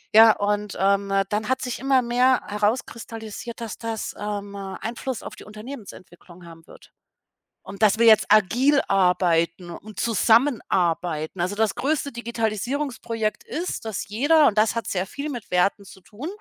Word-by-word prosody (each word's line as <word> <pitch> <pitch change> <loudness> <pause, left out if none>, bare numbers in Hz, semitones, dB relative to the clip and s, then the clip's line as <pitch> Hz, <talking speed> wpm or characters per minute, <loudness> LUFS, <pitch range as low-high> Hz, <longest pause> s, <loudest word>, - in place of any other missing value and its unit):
Ja, 225 0 +9
und, 205 0 -2
ähm, 200 +1 +1 0.2
dann 210 +2 -2
hat 260 0 0
sich 250 -2 -4
immer 270 0 +3
mehr 250 +1 +2
herauskristallisiert, 225 +1 -3
dass 230 -3 -6
das, 225 -1 -4
ähm, 205 -1 -5
Einfluss 220 +6 -5
auf - - -9
die - - -12
Unternehmensentwicklung 205 -6 -11
haben 165 -1 -14
wird - - -17 0.7
und 195 +2 -6
dass 215 +1 +4
wir 230 - +5
jetzt 220 -1 +7
agil 245 +8 +4
arbeiten 180 -2 +1
und 210 +5 -10
zusammenarbeiten. 185 - +1
Also, 185 +4 -1
das 215 -1 +1
größte 280 +2 -1
Digitalisierungsprojekt 230 -1 -3
ist, 335 -7 -4
dass 220 -3 -4
jeder, 290 +8 +4
und 215 - 0
das 215 +2 +3
hat 230 - -3
sehr 185 -1 -1
viel 285 +7 -6
mit 245 -7 -7
Werten 195 +3 +1
zu 190 - -14
tun 210 - -9
215 Hz, 155 wpm, -23 LUFS, 195-240 Hz, 0.7 s, Ja